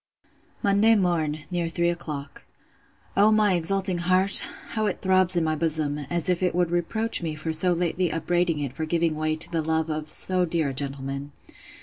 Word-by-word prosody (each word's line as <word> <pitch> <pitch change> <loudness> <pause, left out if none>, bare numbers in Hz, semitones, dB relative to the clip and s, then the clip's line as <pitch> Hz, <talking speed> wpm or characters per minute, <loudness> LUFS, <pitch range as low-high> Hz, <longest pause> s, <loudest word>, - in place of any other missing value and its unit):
'Monday 205 +3 +4
morn, 160 -6 -1
near 175 -2 -2
three 170 +1 0
o'clock.' 150 -5 -7 0.7
O 205 +2 +4
my 215 -2 +3
exulting 185 +1 +1
heart! 185 +3 +6 0.3
how 220 -1 -2
it - - -3
throbs 185 -1 +2
in 170 - +1
my 155 -1 -1
bosom, 155 -2 +1
as 170 -2 -1
if 180 -1 0
it 180 -2 0
would 175 -1 0
reproach 220 +7 -1
me 160 -2 -4
for 160 +1 -4
so 180 +3 +4
lately 175 0 -1
upbraiding 175 0 -1
it 140 -3 -4
for 160 +3 -4
giving 165 0 0
way 155 0 -1
to 155 - -1
the 165 -1 -1
love 160 0 -1
of 155 0 -5
so 185 -1 0
dear 165 -4 -1
a - - -5
gentleman! 140 +1 -4
170 Hz, 190 wpm, -24 LUFS, 155-185 Hz, 0.7 s, heart